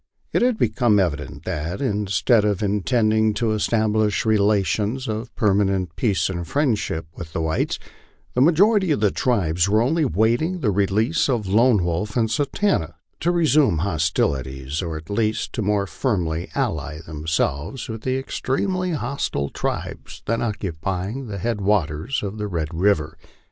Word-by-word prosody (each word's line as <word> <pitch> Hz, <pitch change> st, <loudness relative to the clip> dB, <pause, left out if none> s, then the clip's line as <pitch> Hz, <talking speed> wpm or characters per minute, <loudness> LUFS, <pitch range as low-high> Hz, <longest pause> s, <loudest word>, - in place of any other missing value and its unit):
It -, -, +2 dB
had 245 Hz, -2 st, +2 dB
become 120 Hz, -, +2 dB
evident 80 Hz, -3 st, -2 dB
that, 85 Hz, 0 st, -3 dB
instead 105 Hz, -2 st, +2 dB
of 105 Hz, -1 st, 0 dB
intending 110 Hz, +1 st, +2 dB
to 110 Hz, +1 st, 0 dB
establish 110 Hz, -1 st, +1 dB
relations 110 Hz, +3 st, +1 dB
of 110 Hz, +2 st, -4 dB
per 105 Hz, -3 st, +2 dB
manent 95 Hz, -2 st, +1 dB
peace 100 Hz, -8 st, +1 dB
and 85 Hz, -3 st, -4 dB
friendship 115 Hz, -, 0 dB
with 80 Hz, -3 st, -8 dB
the -, -, -1 dB
whites, 80 Hz, 0 st, 0 dB, 0.6 s
the 125 Hz, -, +1 dB
majority 190 Hz, -, +4 dB
of 150 Hz, -, +2 dB
the 105 Hz, -2 st, +3 dB
tribe 95 Hz, -10 st, 0 dB
were 105 Hz, +2 st, +4 dB
only 155 Hz, +8 st, +2 dB
waiting 125 Hz, -, +1 dB
the 110 Hz, -, +2 dB
release 105 Hz, -, +1 dB
of 120 Hz, -5 st, 0 dB
Lone 110 Hz, +1 st, +4 dB
Wolf 90 Hz, +7 st, -2 dB
and 110 Hz, -2 st, +1 dB
Satanta 140 Hz, -, 0 dB, 0.2 s
to 170 Hz, -, 0 dB
resume 155 Hz, -, +3 dB
hostilities, 70 Hz, -5 st, -1 dB
or 85 Hz, -3 st, -4 dB
at 80 Hz, +1 st, -10 dB
least 110 Hz, +1 st, -1 dB
to 115 Hz, -, -2 dB
more 105 Hz, -1 st, +1 dB
firmly 90 Hz, -, -2 dB
nlly 80 Hz, +1 st, -2 dB
themselves 80 Hz, -, -2 dB
with 110 Hz, -1 st, -6 dB
the 130 Hz, +2 st, -1 dB
extremely 180 Hz, +7 st, -1 dB
hostile 120 Hz, -, -2 dB
tribes -, -, -5 dB
then 115 Hz, +1 st, 0 dB
oc 110 Hz, -3 st, -1 dB
cupying 95 Hz, +8 st, -4 dB
the 100 Hz, -2 st, -5 dB
head 115 Hz, +1 st, -2 dB
waters 95 Hz, -, 0 dB
of 100 Hz, +1 st, -5 dB
Red 85 Hz, -6 st, -3 dB
river. 80 Hz, -3 st, +1 dB
105 Hz, 155 wpm, -22 LUFS, 85-120 Hz, 0.6 s, majority